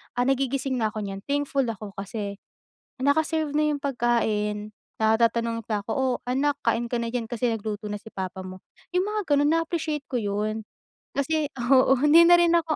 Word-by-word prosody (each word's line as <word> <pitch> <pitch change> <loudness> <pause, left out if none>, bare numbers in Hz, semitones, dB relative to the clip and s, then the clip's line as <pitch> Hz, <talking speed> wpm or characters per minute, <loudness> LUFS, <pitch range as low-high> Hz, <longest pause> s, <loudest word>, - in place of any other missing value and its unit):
ah, 245 - +2
nagigising 270 0 0
na 220 - +2
ako 215 -1 -4
niyan 195 -1 -5
thankful 280 -2 0
ako 215 -2 -5
kasi 200 0 -5 0.6
naka-serve 310 +2 +1
na 305 - +3
yung 285 - -6
pagkain, 220 -5 0 0.3
ah, 220 0 +4
tatanungin 230 -1 +1
pa 210 -2 -1
ako, 200 - -8
"Oh 265 0 +1 0.2
anak 285 +3 +2
kain 235 +1 +1
ka 240 - -2
na 230 - -2
diyan 235 -1 -2
kasi 240 +1 -1
nagluto 215 -1 -4
na 210 - -3
si 215 - -28
papa 190 0 -4
mo" 185 0 -10 0.3
yung 360 - +3
mga 425 0 -1
gano'n 290 +1 +3
na-appreciate 325 -3 -1
ko - - -9
'yon. 210 +2 -2 0.5
Kasi 300 +2 0 0.2
oo, 265 0 +6
hindi 300 +3 +7
na 350 - +8
rin 345 -1 +4
ako 325 -2 +1
245 Hz, 190 wpm, -25 LUFS, 215-290 Hz, 0.6 s, na